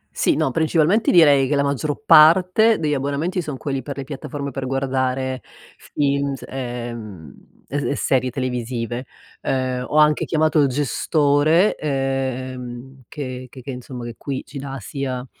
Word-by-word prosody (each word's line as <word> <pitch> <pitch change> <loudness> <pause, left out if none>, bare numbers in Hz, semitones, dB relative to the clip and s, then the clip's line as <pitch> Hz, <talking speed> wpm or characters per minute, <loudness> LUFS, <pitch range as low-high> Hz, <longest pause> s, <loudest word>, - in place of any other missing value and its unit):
Sì, - - +2
no, 135 - +1
principalmente 165 - +2
direi 145 -6 +6
che 145 - +1
la 140 - +2
maggior 140 - -2
parte 185 +7 +6
degli 150 -2 0
abbonamenti 145 +7 -1
son 150 -5 -5
quelli 135 0 -3
per 140 +2 -7
le 140 - -4
piattaforme 140 +1 -6
per 135 0 -4
guardare 130 -1 -1 0.5
film, 140 -1 0
s 130 - -12
e, 120 -2 -5
mhmm, 105 -9 -9 0.4
e 145 +1 -2
e - - 0
serie 130 -2 +1
televisive. 125 -1 -3 0.3
Uhm, 130 -1 -1
ho 150 - -1
anche 150 0 +4
chiamato 155 0 +2
il 140 - +4
gestore, 145 - +2
ehm, 130 -2 -3
che 130 -3 -6
che 130 - -12
che 135 - -5
insomma 125 -1 -8
che 120 - -6
qui 135 +1 -5
ci 140 - -8
dà 135 0 -6
sia 130 +2 -4
135 Hz, 160 wpm, -21 LUFS, 130-150 Hz, 0.5 s, direi